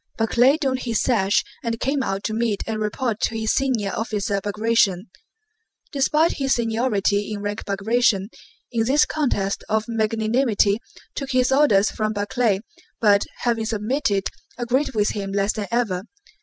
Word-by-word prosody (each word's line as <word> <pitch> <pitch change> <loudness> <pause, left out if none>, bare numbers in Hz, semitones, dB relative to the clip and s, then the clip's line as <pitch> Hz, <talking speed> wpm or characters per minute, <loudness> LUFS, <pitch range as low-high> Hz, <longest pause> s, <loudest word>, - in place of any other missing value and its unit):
Barclay 245 +5 +3
donned 265 -5 -1
his 230 -4 -1
sash 205 -6 +2 0.2
and 230 -1 -2
came 275 +1 0
out 195 -5 -2
to 215 - -2
meet 220 -3 -1
and 220 -1 -3
report 215 +1 -2
to 225 - 0
his 220 0 0
senior 245 -7 0
officer 205 -3 -2
Bagratión. 210 -2 +1 0.9
Despite 300 +4 +2
his 270 -1 +1
seniority 220 -3 0
in 205 -1 -4
rank 205 +1 -4
Bagratión, 200 0 +1 0.4
in 225 -1 0
this 280 +5 +4
contest 205 -10 -1
of 220 0 +1
magnanimity, 220 -1 +1 0.3
took 275 -1 -4
his 255 0 +3
orders 240 -8 +4
from 215 0 -2
Barclay, 205 0 0 0.4
but, 205 -2 +4 0.2
having 230 -2 0
submitted, 215 -2 0 0.3
agreed 255 +2 0
with 210 -1 +2
him 195 -2 -4
less 200 +1 +1
than 210 -2 -4
ever. 220 -6 -1
220 Hz, 150 wpm, -22 LUFS, 205-245 Hz, 0.9 s, this